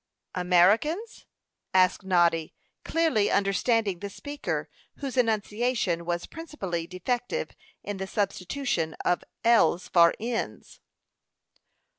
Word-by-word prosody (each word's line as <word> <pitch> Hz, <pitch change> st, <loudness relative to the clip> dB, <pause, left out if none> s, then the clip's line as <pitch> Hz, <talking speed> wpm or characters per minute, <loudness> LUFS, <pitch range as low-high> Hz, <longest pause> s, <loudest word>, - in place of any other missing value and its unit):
"Americans?" 210 Hz, -, +2 dB, 0.5 s
asked 185 Hz, 0 st, +4 dB
Noddy, 170 Hz, -4 st, +2 dB, 0.3 s
clearly 320 Hz, -11 st, +2 dB
understanding 200 Hz, 0 st, +1 dB
the 200 Hz, -, -5 dB
speaker, 285 Hz, +8 st, -4 dB, 0.3 s
whose 275 Hz, -3 st, -5 dB
enunciation 220 Hz, -5 st, 0 dB
was 175 Hz, 0 st, -2 dB
principally 195 Hz, -, -5 dB
defective 245 Hz, -, -2 dB, 0.3 s
in 205 Hz, -1 st, -4 dB
the 190 Hz, 0 st, -4 dB
substitution 195 Hz, -, -2 dB
of 175 Hz, -, +1 dB, 0.2 s
l's 205 Hz, -7 st, +4 dB
for 170 Hz, -1 st, +5 dB
n's. 230 Hz, +1 st, -4 dB
200 Hz, 95 wpm, -27 LUFS, 180-245 Hz, 0.5 s, for